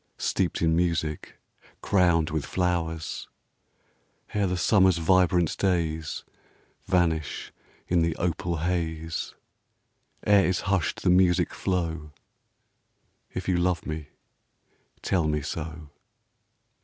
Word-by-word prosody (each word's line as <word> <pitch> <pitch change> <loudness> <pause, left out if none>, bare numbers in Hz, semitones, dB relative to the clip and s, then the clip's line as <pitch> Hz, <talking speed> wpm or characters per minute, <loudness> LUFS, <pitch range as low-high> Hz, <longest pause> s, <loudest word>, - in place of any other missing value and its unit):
Steeped 90 -2 -1
in 80 0 +3
music, 80 -3 -1 0.5
crowned 85 -5 +3
with 80 -2 -1
flowers; 80 -3 -2 1.1
Ere 105 -2 +1
the 90 0 -1
summer's 95 +1 +4
vibrant 90 0 +3
days 80 -5 -1 0.6
Vanish 85 -5 0 0.3
in 90 -1 +2
the 80 -1 +1
opal 85 0 -1
haze; 80 -2 -2 0.9
Ere 100 -2 +5
is 90 -1 0
hushed 95 -4 -1
the - - +4
music 90 -1 +3
flow, 85 -5 -2 0.6
— - - -43
If 95 - -4
you 90 -2 +2
love 90 -1 0
me, 80 -1 -5 1.0
tell 85 -5 +1
me 75 -1 0
so. 75 0 -6
85 Hz, 105 wpm, -26 LUFS, 80-90 Hz, 1.1 s, Ere